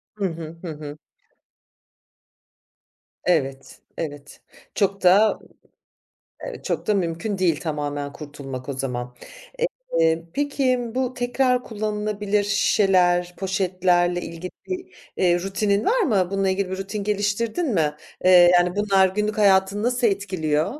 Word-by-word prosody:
Hı 205 - -2
hı. 165 -2 -5
Hı 170 -3 -5
hı. 150 0 -8 2.3
Evet. 135 -6 -1 0.2
Evet. 145 -3 -7 0.3
Çok 195 -1 0
da, 200 +4 +5 1.1
eee, - - -7
çok - - -3
da 210 - +2
mümkün 185 +2 -2
değil 170 -5 +1
tamamen 145 -3 -3
kurtulmak 140 -3 -8
o - - -1
zaman. 125 -2 -4 0.8
Eee, 165 0 +2
peki, 275 -3 +1 0.2
bu 255 0 -1
tekrar 250 0 +1
kullanılabilir 210 -1 -1
şişeler, 180 -3 +2
poşetlerle 180 -2 +1
ilgili 170 +2 -7 0.9
rutinin 200 +2 0
var - - +2
mı? 200 - +2
Bununla 195 -1 0
ilgili, 190 0 -1
bir 190 - -4
rutin 200 +1 -4
geliştirdin 210 - -1
mi? 150 -4 +1 0.3
Eee, 180 -1 +8
yani, 175 +2 +3
bunlar 195 -2 +4
günlük 210 +3 -2
hayatını 195 0 +3
nasıl 245 0 +1
etkiliyor? 180 -7 0
190 Hz, 120 wpm, -23 LUFS, 165-210 Hz, 2.3 s, Eee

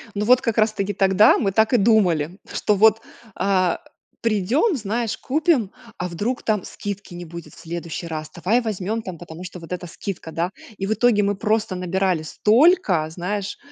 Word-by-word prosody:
Ну 205 - -1
вот, 250 +3 +5
как 230 -4 -2
раз 215 0 +4
таки 200 -1 -2
тогда, 195 +2 +5
мы 195 -3 0
так 220 +3 +3
и - - +6
думали, 190 -7 +2
что 210 - +1
вот, 220 +2 +5 0.3
а, 185 -2 +1 0.4
придем, 230 - +1
знаешь, 225 0 -2
купим, 295 - +1 0.3
а 180 - -3
вдруг 205 +9 -3
там 210 -4 0
скидки 200 -2 -7
не 175 0 -7
будет 170 0 -10
в - - -17
следующий 170 0 -6
раз. 155 -1 -5
Давай 190 +8 +1
возьмем 215 -1 -3
там, 185 -4 -7
потому 170 +1 -10
что 180 0 -8
вот 165 +1 -10
эта 180 0 -4
скидка, 170 -1 -7
да. 170 +3 -1 0.3
И 195 - -3
в 210 - 0
итоге 220 -2 +3
мы 200 0 0
просто 215 -2 0
набирали 180 -1 0
столько, 210 - +3
знаешь, 190 +4 -4
200 Hz, 185 wpm, -22 LUFS, 175-220 Hz, 0.4 s, и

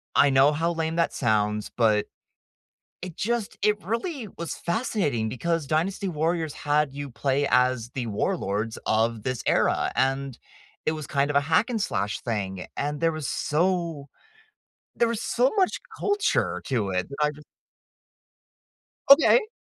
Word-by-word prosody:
I 140 - +6
know 135 +2 +5
how 165 +3 0
lame 165 0 -2
that 170 - +1
sounds, 105 -2 0
but 110 -3 +3 1.0
it 180 -3 -7
just 235 -1 -2
it 210 0 +2
really 230 - -3
was 170 0 -4
fascinating 170 - -1
because 165 +5 -2
Dynasty 185 +6 0
Warriors 160 -1 -1
had 145 -1 0
you 140 -1 -6
play 140 +3 0
as 125 -2 +2
the 125 -3 -3
warlords 110 - -2
of 110 0 +1
this 130 -2 -3
era, - - +2
and 135 -1 0 0.5
it 155 - +3
was 155 -2 -5
kind 140 +1 0
of 140 - 0
a - - +6
hack 160 - +2
and 225 -3 -1
slash 100 - -1
thing, 95 -5 -3
and 145 +1 -2
there 165 -1 +2
was 155 -3 -4
so 165 -3 -1 0.9
there 235 - +3
was 230 -1 -2
so 250 +2 +2
much 375 -2 +2 0.2
culture 410 0 +1
to 110 -7 -1
it 90 0 -1
that 140 - -8
I 150 - +3
just 150 0 -13 1.7
Okay. 425 - +7
150 Hz, 155 wpm, -25 LUFS, 125-175 Hz, 1.7 s, Okay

